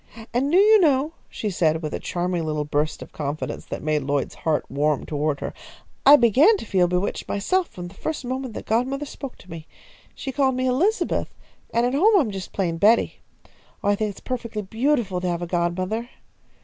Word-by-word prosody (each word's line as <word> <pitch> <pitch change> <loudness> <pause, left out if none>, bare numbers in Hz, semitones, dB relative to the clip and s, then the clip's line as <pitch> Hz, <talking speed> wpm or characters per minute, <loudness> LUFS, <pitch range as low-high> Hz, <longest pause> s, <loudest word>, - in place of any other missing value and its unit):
And 265 +4 +1
do 350 - +5
you 425 +2 +7
know," 300 -2 +2 0.2
she 210 - -3
said, 160 -3 +1
with 155 - -3
a - - -2
charming 175 -1 -2
little 150 -1 -2
burst 150 +1 -1
of - - -14
confidence 150 0 -4
that - - -6
made 155 -1 +1
Lloyd's 140 0 -1
heart 155 -2 -1
warm 150 0 0
toward 150 -1 -1
her, - - -4 0.5
"I 285 - +11
began 285 - +5
to - - -8
feel 185 -4 +2
bewitched 180 +2 -2
myself, 360 - 0
from 175 -1 -8
the 175 - -12
first 300 +5 -4
moment 255 -2 -4
that - - -6
godmother 260 +6 0
spoke 275 -2 -8
to 180 - -16
me? 160 -1 -8 0.5
She 270 - -5
called 265 -1 +1
me 255 0 -1
Elizabeth, 340 - 0 0.4
and 235 +1 +2
at 250 - 0
home 405 +9 +5
I - - +5
am 230 -7 -2
just 190 -1 -6
plain 170 -4 -1
Betty. 220 +5 +3 0.6
Oh, 200 - +2
I 205 - +4
think 215 +1 -1
it 200 - -8
is - - -14
perfectly 230 -4 -4
beautiful 225 -3 0
to 180 - -2
have 175 0 -1
a - - -1
godmother." 185 +7 -1
210 Hz, 210 wpm, -23 LUFS, 170-265 Hz, 0.6 s, I